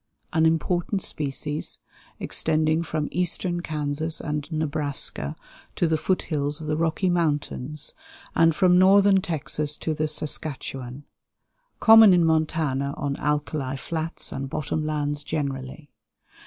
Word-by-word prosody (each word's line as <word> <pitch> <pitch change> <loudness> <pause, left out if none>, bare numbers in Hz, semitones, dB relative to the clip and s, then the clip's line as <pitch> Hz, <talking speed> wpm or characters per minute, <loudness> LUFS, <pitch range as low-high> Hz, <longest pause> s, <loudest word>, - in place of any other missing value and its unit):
An 160 0 +4
important 175 +4 0
species, 150 +1 -3 0.4
extending 155 0 +1
from 155 -1 -2
eastern 175 0 0
Kansas 155 0 -2
and 150 +1 -4
Nebraska 145 - -2 0.4
to - - +1
the 160 - +2
foot 185 +4 0
hills 145 -1 -2
of 160 - -7
the 155 0 -1
Rocky 165 +4 0
Mountains, 150 -4 -1 0.4
and 165 -1 +4
from 180 0 +4
Northern 195 +1 +6
Texas 150 -3 -2
to 160 - -2
the 155 0 -1
Saskatchewan; 140 -3 -3 0.8
common 220 -4 +8
in 175 -2 +4
Montana 155 -4 0
on 140 -1 -2
alkali 150 -2 -2
flats 160 +3 -4
and 135 0 -4
bottom 155 +1 -2
lands 145 -1 -2
generally. 140 0 -4
155 Hz, 125 wpm, -25 LUFS, 145-165 Hz, 0.8 s, common